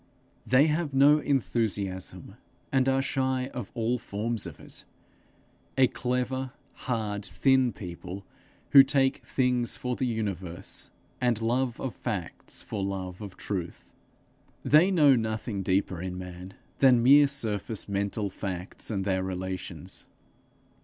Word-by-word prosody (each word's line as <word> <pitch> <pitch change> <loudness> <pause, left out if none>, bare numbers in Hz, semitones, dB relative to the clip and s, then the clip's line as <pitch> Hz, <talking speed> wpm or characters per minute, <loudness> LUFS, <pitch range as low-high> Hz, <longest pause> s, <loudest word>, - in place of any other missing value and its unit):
They 130 +3 +6
have 155 -2 0
no 145 +3 +6
enthusiasm, 105 -9 -2 0.4
and 130 -1 +3
are 135 0 +2
shy 130 -1 -1
of 125 - -5
all 120 +1 0
forms 110 +2 -2
of - - -10
it - - -11 0.9
a 130 - +7
clever, 125 +1 -2 0.4
hard, 105 -4 -1
thin 125 +8 +3
people, 90 0 -8 0.5
who 140 - +11
take 135 0 +2
things 125 -2 0
for 125 -1 -2
the 130 - -1
universe, 95 -7 -4 0.3
and 120 -3 +2
love 120 +2 0
of 130 - -3
facts 100 -9 -5
for 100 -2 -4
love 95 -1 -4
of 100 -3 -8
truth. 90 -4 -5 0.7
They 155 +6 +5
know 150 -8 +6
nothing 110 -2 -2
deeper 95 -2 0
in 90 0 -4
man 90 +1 -8 0.2
than 125 -3 +6
mere 145 +3 +8
surface 110 -6 -3
mental 100 0 -2
facts 90 -1 -5
and 95 -4 -2
their 95 -2 +1
relations. 95 0 -5
115 Hz, 130 wpm, -28 LUFS, 95-130 Hz, 0.9 s, who